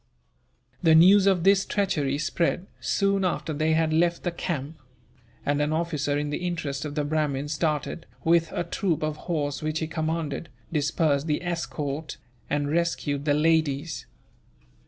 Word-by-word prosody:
The 160 -2 +5
news 190 +4 +7
of 185 -4 +3
this 195 0 +5
treachery 150 -9 0
spread, 170 +4 0
soon 200 -1 +1
after 155 -3 -1
they 155 +2 +1
had 160 0 +2
left 170 +1 +2
the 175 - 0
camp; 160 -3 -4 0.7
and 145 +1 +1
an 150 +1 +1
officer 155 -3 0
in 145 0 -2
the - - -2
interest 165 -5 -3
of 145 -1 -5
the 150 - 0
Brahmins 145 -1 -1
started, 155 +1 -2 0.2
with 165 0 +3
a - - -1
troop 170 -2 -1
of 155 0 -2
horse 145 -4 -1
which 155 0 -1
he 160 - -1
commanded, 160 -1 -3 0.2
dispersed 150 0 +1
the 150 +3 0
escort, 155 -4 -3 0.3
and 145 0 0
rescued 155 -4 0
the 145 -1 +3
ladies. 155 -1 +1
155 Hz, 155 wpm, -26 LUFS, 145-170 Hz, 0.7 s, news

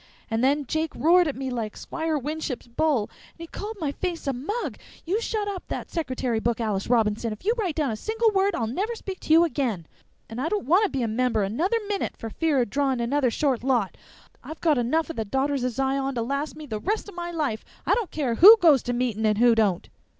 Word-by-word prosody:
And 225 +2 0
then 285 +2 +2
Jake 315 +4 -2
roared 345 +2 +4
at 290 - -2
me 265 0 -4
like 225 -4 -4
Squire 320 -1 -2
Winship's 295 -1 -4
bull.... 255 0 +1 0.3
And - - -33
he - - -5
called 415 +6 -7
my 300 -5 -1
face 345 +2 -4
a 275 - 0
mug.... 370 - -4 0.3
You 390 +7 0
shut 430 -3 -2
up 390 -3 -5
that - - -5
secretary 255 -8 -2
book, 235 +1 -1
Alice 210 -4 -1
Robinson! 225 -1 +1
If 215 - -9
you 445 - +3
write 385 -10 -2
down 295 -6 0
a - - -2
single 445 - 0
word 390 -1 +2
I'll 230 - -1
never 395 - -2
speak 385 -4 -7
to - - -5
you 325 +2 +7
again.... 250 - -1 0.4
And 225 +3 -6
I 315 - -1
don't 415 -1 -2
want 365 - +4
to - - -1
be 270 -5 -2
a - - 0
member' 225 -1 +1
another 320 - 0
minute 405 -1 -2
for 225 - -7
fear 315 -1 +1
of 205 - -8
drawing 275 -3 +1
another 255 +2 +1
short 260 0 0
lot. 245 -7 +1 0.5
I've 315 - -8
got 305 -6 +2
enough 315 +8 0
of - - -11
the 225 - 0
Daughters 270 +4 0
or 250 - +1
Zion 270 +2 -1
to 235 - -1
last 280 +5 -3
me 305 0 -9
the 220 -6 -4
rest 420 - -2
o' 405 - -10
my 345 0 -5
life! 295 -10 -2 0.2
I - - +3
don't 445 -8 0
care 275 -6 -1
who 405 - +10
goes 320 - +5
to 245 - -3
meetin' 235 -3 0
and 210 -1 +2
who 240 +1 +5
don't." 205 -6 +1
280 Hz, 240 wpm, -25 LUFS, 235-340 Hz, 0.5 s, who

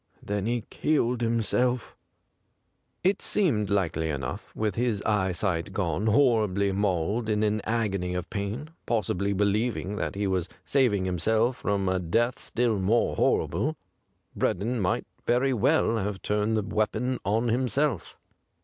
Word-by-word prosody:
Then 105 0 -2
he 120 -1 -1
killed 125 -6 +1
him 115 -1 +1
self 125 +2 0 1.1
It 190 +2 +2
seemed 120 - +1
likely 85 -5 0
enough, 70 -4 -4
with 110 -2 0
his 115 -2 -1
e3'esight 95 -4 0
gone, 95 +2 -1
horribly 105 -5 +3
mauled, 100 +3 0
in 105 0 +1
an 105 0 +1
agony 100 -6 -1
of 90 0 -3
pain, 110 +9 -4 0.2
possibly 100 -3 0
believing 100 -2 0
184. - - -3
THE 105 - -4
GRAY - - 0
CAT - - -7
that - - -5
he 105 - 0
was 95 -2 0 0.2
saving 120 -9 +2
himself 110 +7 +1
from 100 -2 -1
a 95 0 +1
death 115 +8 0
still 115 -4 0
more 105 +5 +2
horrible, - - +1 0.6
Breddon 115 +6 0
might 90 - 0 0.2
very 130 +2 +3
well 125 0 +2
have 100 -2 -3
turned 105 +1 +1
the 105 - 0
weapon 110 +4 -1
on 110 +4 +1
himself. 130 +4 0
105 Hz, 150 wpm, -27 LUFS, 95-120 Hz, 1.1 s, horribly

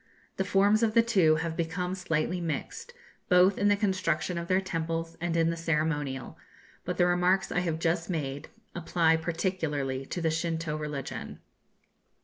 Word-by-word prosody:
The 190 - +1
forms 200 +2 +3
of 225 -1 +1
the 230 - +6
two 190 -9 +4
have 160 +1 -2
become 180 +2 -2
slightly 180 -1 -1
mixed, 170 - -4 0.4
both 180 +1 +5
in 205 - +3
the 205 - +5
construction 185 -4 0
of 170 - -6
their 185 +1 +3
temples 165 -2 -3
and 170 -1 -1
in 165 0 +3
the - - -3
ceremonial; 150 -5 -2 0.5
but 180 - -3
the 175 - +4
remarks 180 +2 +2
I - - +1
have 170 -3 -1
just 165 +1 -1
made 145 -5 -3 0.3
apply 165 -1 +2
particularly 160 -6 -2
to - - -4
the 165 -2 +1
Shintoo 160 -1 -2
religion.' 150 -3 -5
170 Hz, 160 wpm, -28 LUFS, 160-185 Hz, 0.5 s, the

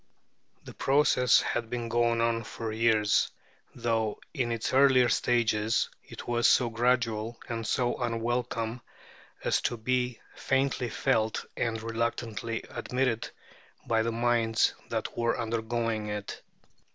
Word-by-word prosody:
The - - -10
process 135 -3 +4
had 115 -1 -2
been 120 -1 -3
going 115 0 +2
on 115 0 +1
for 115 0 -5
years, 110 -1 +3 0.5
though 110 -2 -1
in 125 -6 -1
its 115 +1 -2
earlier 130 -2 +5
stages 110 -2 +1
it - - -10
was 120 0 +3
so 120 -2 +4
gradual 115 -1 0
and 115 -1 -4
so 120 -1 0
unwelcome 120 0 -2 0.6
as - - +2
to 120 - -1
be 125 +1 -1 0.2
faintly 135 -2 0
felt 110 +1 0
and 115 -1 -1
reluctantly 115 0 -2
admitted 125 -1 -1 0.6
by 115 -1 +2
the 115 +1 0
minds 115 -1 +2 0.2
that - - -3
were 120 0 0
undergoing 115 -1 -1
it. 105 -1 -5
115 Hz, 125 wpm, -29 LUFS, 115-120 Hz, 0.6 s, earlier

